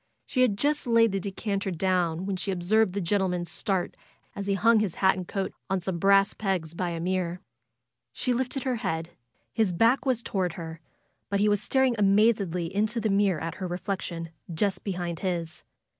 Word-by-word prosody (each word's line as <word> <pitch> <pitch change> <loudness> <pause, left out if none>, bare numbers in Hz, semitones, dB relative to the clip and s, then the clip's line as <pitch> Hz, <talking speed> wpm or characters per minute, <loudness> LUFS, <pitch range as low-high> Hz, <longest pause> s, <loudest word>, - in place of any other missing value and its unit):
She 255 - 0
had 225 -6 +3
just 290 +2 +1
laid 230 -2 +5
the 195 - -1
decanter 200 +1 -3
down 180 -1 0
when 195 -1 -1
she 185 +2 -3
observed 190 +2 +2
the 200 - -1
gentleman 180 -1 0
start 190 +1 -2 0.4
as 200 0 -5
he 200 - +2
hung 225 +3 +4
his 205 -6 -1
coat 190 -1 +3
and 185 -2 -7
hat 195 -1 -2 0.2
on 190 - +1
some 180 -1 -3
brass 195 +2 +4
pegs 185 -6 -2
by 175 +1 -2
a 170 -1 -4
mirror. 180 0 -1 0.7
She 250 - 0
lifted 260 +2 -2
her 255 -2 0
head. 165 -6 -3 0.4
His 220 -5 +2
back 230 +9 +3
was 255 -4 0
toward 185 -5 -1
her, 165 -1 -7 0.5
but 200 - 0
he 210 - +3
was 205 -1 +2
staring 265 +2 +2
amazedly 195 -4 +2
into 215 +4 0
the 220 -1 0
mirror 195 -4 +2
at 165 0 -3
her 185 - -1
reflection 175 -2 -4 0.2
just 190 +4 -1
behind 175 -4 -3
his. 170 -4 -3
195 Hz, 190 wpm, -27 LUFS, 175-215 Hz, 0.7 s, laid